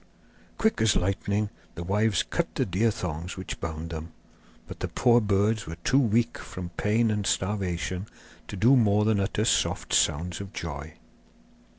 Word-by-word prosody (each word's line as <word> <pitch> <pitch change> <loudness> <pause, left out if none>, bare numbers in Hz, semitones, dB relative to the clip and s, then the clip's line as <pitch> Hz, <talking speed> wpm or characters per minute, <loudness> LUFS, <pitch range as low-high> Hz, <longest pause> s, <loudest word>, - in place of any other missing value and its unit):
Quick 220 -1 +1
as 110 -2 +4
lightning 100 +3 0 0.2
the 85 - -5
wives 105 +2 +2
cut - - -2
the - - +1
deer 100 +6 +2
thongs 90 -3 -4
which 95 - -6
bound 80 0 -5
them; 80 0 -6 0.5
but - - -9
the - - -2
poor 120 -1 +4
birds 105 +1 +1
were 80 - -5
too 135 - +4
weak 115 -2 +1
from 90 -1 -7
pain 110 +6 +1
and 105 -1 -1
starvation 95 -1 -1 0.4
to - - -6
do 120 +8 +5
more 105 -3 +4
than 110 -2 +2
utter 105 +2 0
soft - - +1
sounds 85 +5 +1
of 100 +1 -9
joy. 75 -1 -6
100 Hz, 165 wpm, -27 LUFS, 85-110 Hz, 0.5 s, do